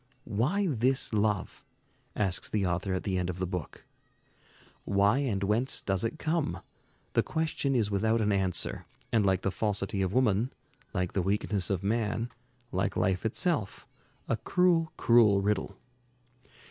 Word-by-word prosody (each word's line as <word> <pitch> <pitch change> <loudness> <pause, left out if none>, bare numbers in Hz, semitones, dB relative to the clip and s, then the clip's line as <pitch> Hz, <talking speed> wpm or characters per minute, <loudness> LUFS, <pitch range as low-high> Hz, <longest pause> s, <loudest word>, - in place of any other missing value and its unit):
"Why 130 - 0
this 130 - +1
love?" 105 -3 0 0.5
asks 95 -4 0
the 105 -3 0
author 90 +2 -1
at 95 - -3
the 95 -2 -1
end 90 0 -2
of 90 - -4
the 95 - -1
book. 90 -3 -6 1.0
"Why 100 +5 +3
and 110 -9 -1
whence 110 +6 +2
does 95 0 -1
it 115 +7 -2
come? 160 0 -1 0.5
The - - +4
question 155 -4 -1
is 110 -4 +1
without 110 +3 +2
an 105 -1 +1
answer, 95 -3 -1 0.2
and 110 -2 +3
like 95 -1 +2
the 100 - 0
falsity 100 -1 -1
of 95 -1 0
woman, 120 0 +2 0.4
like 90 -2 -2
the 95 - +1
weakness 100 +1 0
of 95 -2 -1
man, 110 +2 -1 0.4
like - - -1
life 95 +3 +1
itself, 130 - -1 0.4
a - - 0
cruel, 170 -3 +2
cruel 115 -4 +5
riddle." 100 -1 -1
105 Hz, 150 wpm, -29 LUFS, 95-120 Hz, 1.0 s, cruel